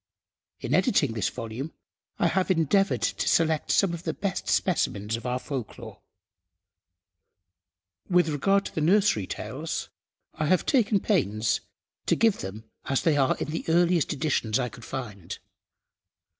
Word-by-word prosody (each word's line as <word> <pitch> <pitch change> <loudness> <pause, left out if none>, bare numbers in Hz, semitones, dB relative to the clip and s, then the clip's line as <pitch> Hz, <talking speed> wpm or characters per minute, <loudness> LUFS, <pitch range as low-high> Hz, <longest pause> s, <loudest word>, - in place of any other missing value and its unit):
In 125 - -2
editing 155 - +3
this 105 -3 0
volume 120 +7 -6 0.4
I - - +1
have 185 +3 +1
endeavoured 190 +3 +2
to - - -1
select 160 -2 +2
some 195 -4 +3
of 170 - -5
the - - -3
best 195 -1 -3
specimens 105 - 0
of 115 +2 -6
our 125 0 0
Folklore. 130 -3 -7 2.1
With 180 -2 +4
regard 195 +7 +2
to - - -6
the 160 - -2
nursery 170 - +3
tales, - - -5 0.4
I 155 - -2
have 185 +2 +2
taken 220 -7 +2
pains 110 - +1 0.5
to - - +3
give 225 -3 +2
them 100 +3 -6 0.2
as 135 - 0
they 160 -3 +3
are 135 -2 +2
in 150 - -4
the 165 - -3
earliest 170 -1 +3
editions 140 -7 0
I 125 -2 -1
could 115 - -12
find. 105 -10 -6
155 Hz, 145 wpm, -26 LUFS, 120-185 Hz, 2.1 s, With